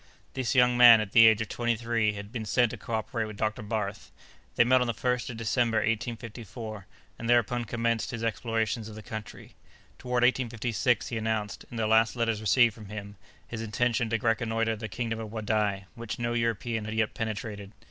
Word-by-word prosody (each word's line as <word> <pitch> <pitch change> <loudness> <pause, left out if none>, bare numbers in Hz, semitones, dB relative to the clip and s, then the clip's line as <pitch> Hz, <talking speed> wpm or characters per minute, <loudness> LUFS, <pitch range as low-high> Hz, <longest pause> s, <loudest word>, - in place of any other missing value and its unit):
This 130 0 -1
young 125 -1 +4
man, 120 -2 +9
at 105 -2 -3
the 115 0 +8
age 110 0 +4
of 110 - -4
twenty 120 -1 0
three, 115 -2 0
had 105 0 -8
been 115 -2 -4
sent 115 +2 +2
to - - -6
cooperate 115 0 -3
with 105 -1 -8
Dr. 110 0 -1
Barth. 105 -1 -4 0.4
They - - +6
met 130 +1 +4
on 125 - +1
the 115 - -2
1st 125 +2 -1
of 120 - -6
December, 115 0 +1
1854, 115 -2 -4 0.3
and 115 - -4
thereupon 120 0 +2
commenced 115 0 -1
his 115 -2 -5
explorations 115 0 -1
of 105 - -10
the 110 - -9
country. 110 -2 -8 0.5
Toward 125 -1 0
1856, 120 -1 +1
he 120 - -3
announced, 110 -2 -3
in 120 - -8
the 110 - 0
last 110 +2 +3
letters 115 -3 0
received 115 +2 +4
from 105 -2 -12
him, 100 -1 -7 0.3
his 115 -1 -5
intention 115 +1 0
to 115 - +1
reconnoitre 115 0 0
the 110 0 -6
kingdom 115 +1 -3
of 110 -2 -6
Wadai, 105 -3 -1
which 115 -1 -6
no 120 0 -2
European 115 -1 -1
had 110 +1 -4
yet 110 -1 0
penetrated. 105 -2 -5
115 Hz, 195 wpm, -28 LUFS, 110-120 Hz, 0.5 s, man